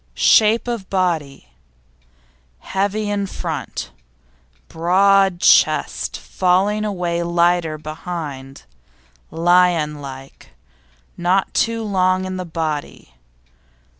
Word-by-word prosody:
SHAPE 220 - +4
OF 230 -6 -4
BODY 160 - -2 1.1
Heavy 205 +2 -2
in 205 -1 -2
front; 160 -9 -5 0.8
broad 190 +2 +2
chest - - +2
falling 195 +3 0
away 175 -5 -2
lighter 170 -2 +1
behind; 155 - -7 0.7
lion 165 -3 +2
like; 135 -1 -11 0.6
not 185 +2 0
too 230 -1 0
long 185 -2 +1
in 185 0 -5
the 185 - -5
body. 160 - -5
180 Hz, 85 wpm, -19 LUFS, 160-195 Hz, 1.1 s, SHAPE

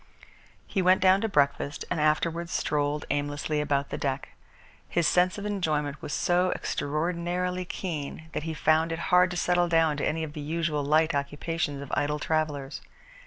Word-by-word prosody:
He 195 - -1
went 185 +1 +5
down 190 +1 +5
to 225 - 0
breakfast 145 -3 +1
and 180 - 0
afterwards 165 +2 +1
strolled 145 0 0
aimlessly 145 +1 -1
about 140 -1 0
the - - -3
deck. 135 -1 -2 0.6
His 170 -2 +2
sense 180 +2 +3
of 205 - -5
enjoyment 155 -8 -1
was - - -6
so 180 +3 +2
extraordinarily 175 +4 -2
keen 160 -4 -5
that - - -2
he 160 +1 -4
found 160 +2 +2
it 165 - -2 0.2
hard 180 0 +6
to 180 - -4
settle 175 0 +2
down 165 -3 +3
to 140 - -3
any 160 +1 0
of 150 -2 -6
the 150 - -6
usual 155 -1 -1
light 155 +3 +3
occupations 145 +1 -2
of 140 - -10
idle 150 +1 0
travellers. 150 -3 -2
160 Hz, 170 wpm, -27 LUFS, 145-175 Hz, 0.6 s, hard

